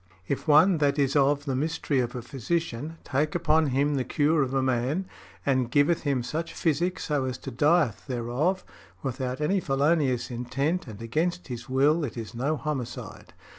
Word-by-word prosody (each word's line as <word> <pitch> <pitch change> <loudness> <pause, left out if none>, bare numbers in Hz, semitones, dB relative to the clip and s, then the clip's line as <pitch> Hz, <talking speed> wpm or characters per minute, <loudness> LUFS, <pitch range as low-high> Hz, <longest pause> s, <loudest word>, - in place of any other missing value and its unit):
"If 140 - -3
one 160 +4 +6
that 145 -1 +2
is 140 -1 +1
of 145 0 +3
the 135 -3 -1
mystery 150 -1 0
of 125 0 -1
a 120 - -5
physician 150 +3 -3
take 150 +4 -1
upon 160 -2 +3
him 140 +2 +1
the 135 -2 0
cure 150 +3 +2
of 130 -2 0
a 135 -1 +1
man, 130 +8 0 0.4
and 130 -3 +1
giveth 145 +5 +3
him 140 -4 0
such 165 +5 -4
physic 170 +3 0
so 145 -3 -1
as 130 0 -4
he 135 - -4
dieth 145 - +2
thereof, 130 +9 -1 0.4
without 130 0 -3
any 190 +6 +2
felonious 135 -4 +1
intent 135 +9 -2
and 110 0 -8
against 165 +8 -1
his 120 0 -6
will, 145 +5 +3
it 125 -4 -4
is 115 0 -6
no 140 +6 -1
homicide." 135 -6 -5
140 Hz, 175 wpm, -27 LUFS, 130-155 Hz, 0.4 s, one